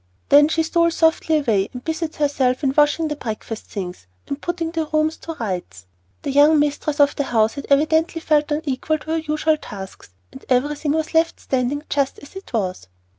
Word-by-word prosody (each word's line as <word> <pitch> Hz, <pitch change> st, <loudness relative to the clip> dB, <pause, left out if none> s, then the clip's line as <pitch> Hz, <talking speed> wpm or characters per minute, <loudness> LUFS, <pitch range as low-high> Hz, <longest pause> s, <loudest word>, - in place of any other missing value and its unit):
Then 290 Hz, +1 st, +7 dB
she 320 Hz, +1 st, +1 dB
stole 335 Hz, +1 st, +2 dB
softly 320 Hz, -1 st, +2 dB
away 215 Hz, -9 st, +1 dB
and 250 Hz, 0 st, -8 dB
busied 320 Hz, 0 st, -3 dB
herself 280 Hz, -2 st, +1 dB
in 265 Hz, -1 st, +2 dB
washing 300 Hz, +2 st, +3 dB
the 300 Hz, -, -3 dB
breakfast 225 Hz, -3 st, -6 dB
things 180 Hz, -, -7 dB, 0.2 s
and 280 Hz, -, -5 dB
putting 345 Hz, -2 st, -3 dB
the 325 Hz, -2 st, -2 dB
rooms 310 Hz, +1 st, +1 dB
to 330 Hz, -, -7 dB
rights. 180 Hz, -, -5 dB, 0.4 s
The 280 Hz, -, -2 dB
young 295 Hz, +3 st, +6 dB
mistress 295 Hz, 0 st, 0 dB
of 285 Hz, 0 st, +4 dB
the 285 Hz, -, -1 dB
house 225 Hz, -3 st, +2 dB
had 280 Hz, -, -7 dB
evidently 315 Hz, +4 st, +2 dB
felt 300 Hz, -2 st, +1 dB
unequal 295 Hz, 0 st, -1 dB
to 315 Hz, -, -7 dB
her 325 Hz, -, +1 dB
usual 310 Hz, 0 st, 0 dB
tasks, 190 Hz, -, -10 dB, 0.2 s
and -, -, -12 dB
everything 290 Hz, +3 st, +1 dB
was 315 Hz, +1 st, -2 dB
left 325 Hz, +1 st, +2 dB
standing 265 Hz, +3 st, -1 dB
just 280 Hz, -2 st, 0 dB
as 285 Hz, -, -14 dB
it 385 Hz, -, -10 dB
was. 185 Hz, -, -2 dB
295 Hz, 190 wpm, -21 LUFS, 255-315 Hz, 0.4 s, Then